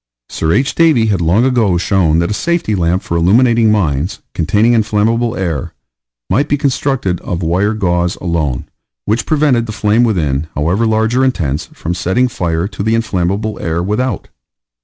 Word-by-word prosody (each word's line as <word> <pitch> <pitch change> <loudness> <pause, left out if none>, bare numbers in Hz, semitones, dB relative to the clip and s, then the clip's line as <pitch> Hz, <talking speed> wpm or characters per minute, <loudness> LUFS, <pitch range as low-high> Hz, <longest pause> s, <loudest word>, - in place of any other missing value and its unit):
Sir 80 - -1
H. 135 +10 +1
Davy 155 -9 +3
had 95 - -1
long 90 +9 +2
ago 115 -9 +2
shown 85 -3 +1
that 85 +4 0
a - - +1
safety 170 -3 -1
lamp 90 -1 0
for 85 - -3
illuminating 115 +6 +3
mines, 85 -4 0 0.2
containing 105 +8 +2
inflammable 115 +2 +1
air, 85 -7 -3 0.5
might 135 +11 0
be 145 - +2
constructed 135 -9 -1
of 90 0 -4
wire 95 +6 +1
gauze, 90 -3 0
alone, 80 -8 -2 0.4
which 110 +3 -1
prevented 145 -7 +2
the - - -4
flame 105 +2 +1
within, 80 - 0
however 90 +10 +1
large 110 +2 +1
or 130 - +3
intense, 80 - -1
from 85 - -4
setting 95 +8 +1
fire 85 -6 -2
to 100 - -7
the 110 +2 +1
inflammable 105 -1 -1
air 80 +1 -2
without. 105 +3 -2
105 Hz, 165 wpm, -15 LUFS, 85-115 Hz, 0.5 s, Davy